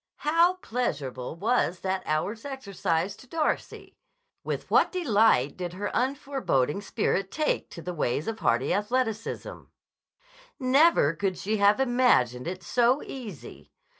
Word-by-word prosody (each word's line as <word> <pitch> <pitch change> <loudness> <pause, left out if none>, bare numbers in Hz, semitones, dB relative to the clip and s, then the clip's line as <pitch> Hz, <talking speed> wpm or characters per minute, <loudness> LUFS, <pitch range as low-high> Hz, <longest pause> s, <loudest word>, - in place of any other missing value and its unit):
How 335 +4 +4
pleasurable 140 - -3
was 195 -2 0
that 190 0 -1
hour's 200 +9 -1
exercise 200 -9 -2
to 260 - -16
Darcy! 310 +3 -3 0.4
With - - -4
what - - +4
delight 220 - +2
did 175 -1 -4
her 205 +3 -4
unforeboding 255 - 0
spirit 195 -2 -1
take 305 +6 -1
to 170 - -10
the 180 - -4
ways 150 -2 -1
of 225 0 -3
a - - -18
hardy 120 +3 +2
athleticism! 225 +1 -2 0.9
'Never 265 - +4
could 185 +2 -2
she 215 +2 -1
have 205 +2 +4
imagined 240 - +2
it 185 +1 -5
so 245 +8 +2
easy. 225 - -9
205 Hz, 135 wpm, -27 LUFS, 175-255 Hz, 0.9 s, How